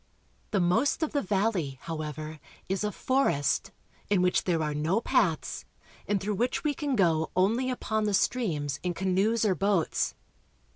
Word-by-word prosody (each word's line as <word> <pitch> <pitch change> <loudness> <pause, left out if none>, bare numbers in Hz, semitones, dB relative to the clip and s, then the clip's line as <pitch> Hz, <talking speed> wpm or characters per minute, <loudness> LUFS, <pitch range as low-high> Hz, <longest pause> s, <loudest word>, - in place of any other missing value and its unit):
The 205 - +1
most 220 - +2
of 315 - -1
the 285 - +1
valley, 190 -8 0
however, 155 -1 -5 0.3
is 190 +2 -1
a 210 - 0
forest, 255 - +1 0.4
in 195 -3 +3
which 180 - +2
there 165 -3 +1
are 150 -1 -1
no 155 +8 +1
paths, - - 0 0.4
and 205 -1 +1
through 205 +3 -2
which 240 +5 -1
we 300 -2 +1
can 285 -1 -2
go 165 -6 +2
only 225 +8 +2
upon 220 -4 -1
the 205 -1 +2
streams 155 - 0
in 180 -1 -2
canoes 195 +5 +1
or 200 - +3
boats. 195 -1 0
195 Hz, 160 wpm, -28 LUFS, 165-225 Hz, 0.4 s, in